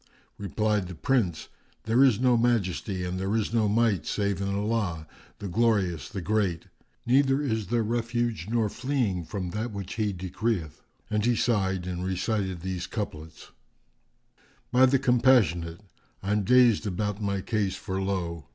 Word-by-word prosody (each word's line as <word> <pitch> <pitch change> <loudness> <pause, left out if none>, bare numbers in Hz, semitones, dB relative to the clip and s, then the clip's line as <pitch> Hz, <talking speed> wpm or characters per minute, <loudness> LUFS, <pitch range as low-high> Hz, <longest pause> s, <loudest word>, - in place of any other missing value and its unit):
Replied 105 -1 0
the 90 - -8
Prince, 105 - 0 0.4
"There 115 +4 +4
is 125 -6 +4
no 125 -1 +4
Majesty 100 -5 0
and 90 +1 -3
there 95 +3 -1
is 110 0 -1
no 110 -3 +2
Might 105 -7 +1
save 100 -2 -1
in 100 - -1
Allah, 100 -5 -1 0.3
the 105 - -6
Glorious, 95 - +1
the 95 - -5
Great! 100 -4 0 0.4
Neither 135 +1 +3
is 110 -7 -1
there 120 +1 +1
refuge 115 -4 -1
nor 115 -2 +1
fleeing 120 - -1
from 90 0 -4
that 110 +5 -3
which 100 -2 -6
He 105 -2 +1
decreeth!" 95 -3 -3 0.3
And 105 -1 +1
he 120 +1 +3
sighed 95 -6 0
and 90 -1 -4
recited 95 -1 -2
these 95 0 -4
couplets, 80 -7 -6 1.2
"By 130 +1 +6
the 135 +1 +3
Compassionate, 120 - +3 0.4
I'm 105 +2 +1
dazed 120 -3 +5
about 105 +2 -2
my 100 -1 -1
case 105 -2 -1
for 95 -2 -4
lo! 85 -4 -3
105 Hz, 150 wpm, -27 LUFS, 95-115 Hz, 1.2 s, By